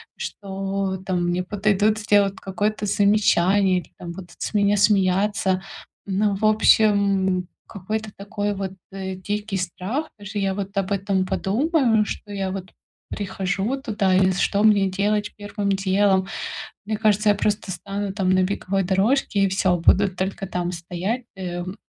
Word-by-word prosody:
что, 195 Hz, -1 st, -4 dB
там, 180 Hz, -2 st, 0 dB
мне 180 Hz, +1 st, 0 dB
подойдут 210 Hz, +2 st, +1 dB
сделать 205 Hz, -2 st, +3 dB
какое-то 210 Hz, +1 st, -2 dB
замечание 200 Hz, -2 st, +3 dB
или, -, -, -13 dB
там, 170 Hz, -, -7 dB
будут 180 Hz, 0 st, -10 dB
с -, -, -4 dB
меня 205 Hz, 0 st, +3 dB
смеяться. 195 Hz, -1 st, +2 dB, 0.4 s
Ну, 200 Hz, +1 st, +1 dB
в 200 Hz, -, -7 dB
общем, 200 Hz, -4 st, +3 dB, 0.2 s
какой-то 215 Hz, +2 st, -4 dB
такой 205 Hz, +1 st, -3 dB
вот, 195 Hz, -1 st, -3 dB, 0.2 s
э, 190 Hz, -1 st, -5 dB
дикий 205 Hz, +1 st, -3 dB
страх. 190 Hz, -, -3 dB
Даже 205 Hz, 0 st, -5 dB
я 195 Hz, -1 st, 0 dB
вот 200 Hz, 0 st, -5 dB
об 195 Hz, 0 st, -1 dB
этом 195 Hz, -1 st, +1 dB
подумаю, 235 Hz, -, +2 dB
что 205 Hz, -1 st, -6 dB
я 195 Hz, -1 st, -2 dB
вот 185 Hz, -1 st, -6 dB, 0.4 s
прихожу 200 Hz, +5 st, -2 dB
туда, 200 Hz, -6 st, +1 dB
и 190 Hz, 0 st, +4 dB
что 200 Hz, +2 st, +1 dB
мне 205 Hz, -3 st, +4 dB
делать 205 Hz, +2 st, 0 dB
первым 205 Hz, 0 st, -3 dB
делом. 195 Hz, 0 st, +2 dB, 0.6 s
Мне 215 Hz, +1 st, -2 dB
кажется, 215 Hz, -1 st, +3 dB
я 205 Hz, -, +4 dB
просто 205 Hz, 0 st, -1 dB
стану 195 Hz, +3 st, -4 dB
там 195 Hz, -2 st, 0 dB
на 185 Hz, 0 st, +4 dB
беговой 195 Hz, 0 st, -1 dB
дорожке 200 Hz, +5 st, +1 dB
и -, -, +4 dB
всё, 185 Hz, -1 st, +2 dB
буду 190 Hz, +4 st, +4 dB
только 195 Hz, +2 st, -3 dB
там 175 Hz, -1 st, -2 dB
стоять, 180 Hz, +8 st, -3 dB
эм, 180 Hz, +1 st, -5 dB
195 Hz, 150 wpm, -23 LUFS, 190-210 Hz, 0.6 s, и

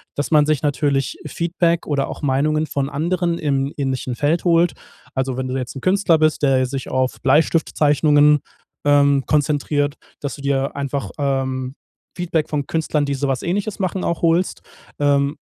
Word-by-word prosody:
dass 145 Hz, +3 st, -3 dB
man 150 Hz, -1 st, +5 dB
sich 155 Hz, -3 st, +1 dB
natürlich 145 Hz, -, 0 dB
Feedback 170 Hz, -1 st, 0 dB
oder 140 Hz, -2 st, 0 dB
auch -, -, -7 dB
Meinungen 150 Hz, +3 st, +1 dB
von 140 Hz, -1 st, -2 dB
anderen 170 Hz, +3 st, -1 dB
im 140 Hz, -1 st, -1 dB
ähnlichen 130 Hz, -3 st, -2 dB
Feld 155 Hz, +8 st, 0 dB
holt. 170 Hz, 0 st, +3 dB, 0.4 s
Also, 130 Hz, -1 st, -1 dB
wenn 130 Hz, 0 st, -2 dB
du 130 Hz, +1 st, -2 dB
jetzt 125 Hz, 0 st, -5 dB
'n 135 Hz, -, -6 dB
Künstler 185 Hz, -3 st, +3 dB
bist, 155 Hz, -1 st, +1 dB
der 130 Hz, -2 st, +3 dB
sich 135 Hz, 0 st, -5 dB
auf 130 Hz, 0 st, -1 dB
Bleistiftzeichnungen, 150 Hz, 0 st, +3 dB, 0.5 s
ähm, 140 Hz, -1 st, +4 dB
konzentriert, 145 Hz, -1 st, 0 dB, 0.3 s
dass 145 Hz, -, -4 dB
du 140 Hz, -, -12 dB
dir 140 Hz, -1 st, -1 dB
einfach, 140 Hz, 0 st, -3 dB
ähm, 130 Hz, -2 st, -2 dB, 0.4 s
Feedback 165 Hz, -3 st, -1 dB
von 145 Hz, -2 st, -2 dB
Künstlern, 155 Hz, -2 st, 0 dB
die 140 Hz, -, -1 dB
so 140 Hz, +1 st, -2 dB
etwas 135 Hz, -2 st, -1 dB
Ähnliches 200 Hz, +4 st, -2 dB
machen, 185 Hz, 0 st, -2 dB
auch 170 Hz, -, -2 dB
holst. 170 Hz, +2 st, +1 dB, 0.4 s
Ähm, 140 Hz, 0 st, +2 dB
145 Hz, 165 wpm, -20 LUFS, 135-160 Hz, 0.5 s, man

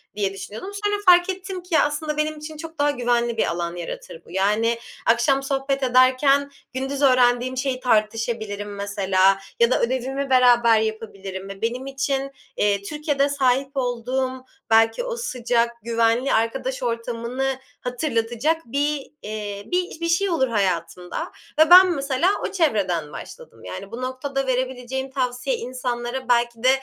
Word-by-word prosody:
diye 200 Hz, -2 st, -1 dB
düşünüyordum. 210 Hz, -, -7 dB
Sonra 415 Hz, 0 st, +2 dB
fark 355 Hz, 0 st, +6 dB
ettim 375 Hz, -1 st, -5 dB
ki 360 Hz, -1 st, -9 dB
ya, -, -, +5 dB
aslında 295 Hz, +1 st, -3 dB
benim 305 Hz, 0 st, -1 dB
için 305 Hz, +1 st, -8 dB
çok 325 Hz, 0 st, -9 dB
daha 290 Hz, 0 st, +3 dB
güvenli 240 Hz, -3 st, 0 dB
bir -, -, +3 dB
alan 170 Hz, 0 st, -3 dB
yaratır 170 Hz, -1 st, -7 dB
bu. -, -, -15 dB
Yani 210 Hz, +5 st, +1 dB, 0.3 s
akşam 240 Hz, +4 st, +3 dB
sohbet 270 Hz, 0 st, -1 dB
ederken 260 Hz, +3 st, +4 dB, 0.2 s
gündüz 270 Hz, +2 st, -3 dB
öğrendiğim 255 Hz, -1 st, +3 dB
şeyi 260 Hz, -1 st, -1 dB
tartışabilirim 215 Hz, -3 st, -1 dB
mesela 195 Hz, -1 st, +2 dB, 0.2 s
ya 235 Hz, +1 st, +4 dB
da -, -, +2 dB
ödevimi 260 Hz, +3 st, -1 dB
beraber 240 Hz, -3 st, +5 dB
yapabilirim 200 Hz, -3 st, -5 dB
ve 195 Hz, 0 st, -9 dB
benim 245 Hz, +3 st, -2 dB
için, 275 Hz, 0 st, -2 dB, 0.3 s
eee, 200 Hz, -1 st, +2 dB
Türkiye'de 290 Hz, +3 st, 0 dB
sahip 270 Hz, -1 st, +1 dB
olduğum 255 Hz, +1 st, -2 dB, 0.2 s
belki 225 Hz, -, +4 dB
o -, -, -3 dB
sıcak, 240 Hz, -, 0 dB
güvenli 230 Hz, +3 st, +1 dB
arkadaş 260 Hz, +4 st, -1 dB
ortamını 240 Hz, +3 st, -2 dB, 0.2 s
hatırlatacak 250 Hz, +4 st, -1 dB
bir, 285 Hz, +3 st, -2 dB
eee, 205 Hz, -1 st, -5 dB
bir 360 Hz, -2 st, -1 dB
bir 335 Hz, -, -1 dB
şey 390 Hz, +4 st, +2 dB
olur 270 Hz, -7 st, +2 dB
hayatımda 180 Hz, -5 st, -2 dB, 0.3 s
ve 315 Hz, 0 st, +6 dB
ben 365 Hz, +1 st, +10 dB
mesela 280 Hz, +2 st, +1 dB, 0.2 s
o -, -, -8 dB
çevreden 190 Hz, -, 0 dB
başladım. -, -, -11 dB
Yani 200 Hz, +1 st, -8 dB
bu 235 Hz, +2 st, -6 dB
noktada 265 Hz, +1 st, -3 dB
verebileceğim 260 Hz, +1 st, -2 dB
tavsiye 255 Hz, -, -1 dB
insanlara 250 Hz, -, -4 dB
belki 235 Hz, -1 st, +1 dB
de 255 Hz, -, +6 dB
255 Hz, 150 wpm, -23 LUFS, 225-275 Hz, 0.3 s, ben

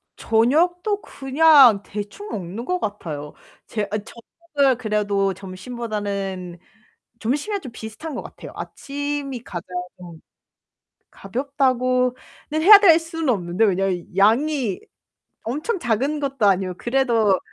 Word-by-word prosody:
저녁도 350 Hz, -, +1 dB
그냥 270 Hz, -6 st, +5 dB
대충 210 Hz, -, -7 dB
먹는 195 Hz, +4 st, -5 dB
것 365 Hz, +4 st, -1 dB
같아요. 155 Hz, -, -5 dB, 0.3 s
제 210 Hz, -2 st, -3 dB
아 210 Hz, -, 0 dB
저녁을 270 Hz, +5 st, -2 dB
그래도 205 Hz, -4 st, 0 dB
점심보다는 195 Hz, -2 st, -5 dB, 0.6 s
점심이랑 295 Hz, -, -2 dB
좀 265 Hz, -7 st, -9 dB
비슷한 225 Hz, +8 st, -7 dB
것 -, -, -4 dB
같아요. -, -, -11 dB
아침이 285 Hz, -3 st, -5 dB
가장 175 Hz, -3 st, -6 dB, 1.5 s
가볍다고는 255 Hz, +2 st, 0 dB, 0.5 s
해야 405 Hz, +4 st, +10 dB
될 345 Hz, -6 st, +7 dB
수는 325 Hz, -2 st, -4 dB
없는데 185 Hz, -2 st, +1 dB
왜냐면 190 Hz, -3 st, 0 dB
양이 235 Hz, +1 st, +2 dB, 0.7 s
엄청 300 Hz, -, -2 dB
작은 275 Hz, +2 st, -1 dB
것도 275 Hz, -6 st, 0 dB
아니고 190 Hz, -2 st, +2 dB
그래도 235 Hz, -6 st, +2 dB
240 Hz, 250 characters per minute, -22 LUFS, 200-285 Hz, 1.5 s, 해야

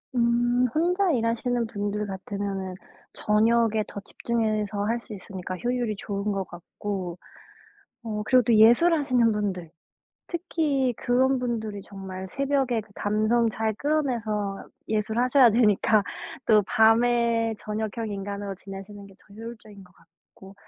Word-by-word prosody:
음 240 Hz, +1 st, +2 dB
혼자 360 Hz, +4 st, +2 dB
일하시는 235 Hz, -1 st, 0 dB
분들 205 Hz, -1 st, -3 dB
같으면은 195 Hz, -1 st, -4 dB, 0.4 s
저녁에 220 Hz, +1 st, +2 dB
더 -, -, -7 dB
집중해서 215 Hz, -2 st, -2 dB
할 230 Hz, +3 st, 0 dB
수 230 Hz, -2 st, -11 dB
있으니까 185 Hz, -1 st, -7 dB
효율이 240 Hz, -1 st, -1 dB
좋은 200 Hz, 0 st, -3 dB
것 195 Hz, -1 st, -1 dB
같고 180 Hz, +1 st, -6 dB, 0.9 s
어 215 Hz, -2 st, -3 dB
그리고 255 Hz, +1 st, +5 dB
또 235 Hz, 0 st, +2 dB
예술하시는 245 Hz, +1 st, +5 dB
분들 190 Hz, -6 st, -3 dB, 0.6 s
특히 300 Hz, -7 st, 0 dB
그런 260 Hz, +2 st, +2 dB
분들이 220 Hz, -4 st, -3 dB
정말 190 Hz, -1 st, -8 dB
새벽에 270 Hz, -2 st, 0 dB
그 215 Hz, -, -16 dB
감성 215 Hz, +3 st, +1 dB
잘 220 Hz, 0 st, -1 dB
끌어내서 220 Hz, -8 st, -1 dB, 0.2 s
예술하셔야 235 Hz, +4 st, +3 dB
되니까 215 Hz, -1 st, +3 dB, 0.4 s
또 215 Hz, -2 st, +5 dB
밤에 230 Hz, 0 st, +3 dB
저녁형 215 Hz, +1 st, -4 dB
인간으로 200 Hz, 0 st, -4 dB
지내시는 195 Hz, +1 st, -10 dB
게 195 Hz, -, -16 dB
더 200 Hz, -, -20 dB
효율적인 220 Hz, -2 st, -10 dB
것 180 Hz, -, -21 dB
같고 175 Hz, +3 st, -18 dB
220 Hz, 285 characters per minute, -26 LUFS, 200-240 Hz, 0.9 s, 그리고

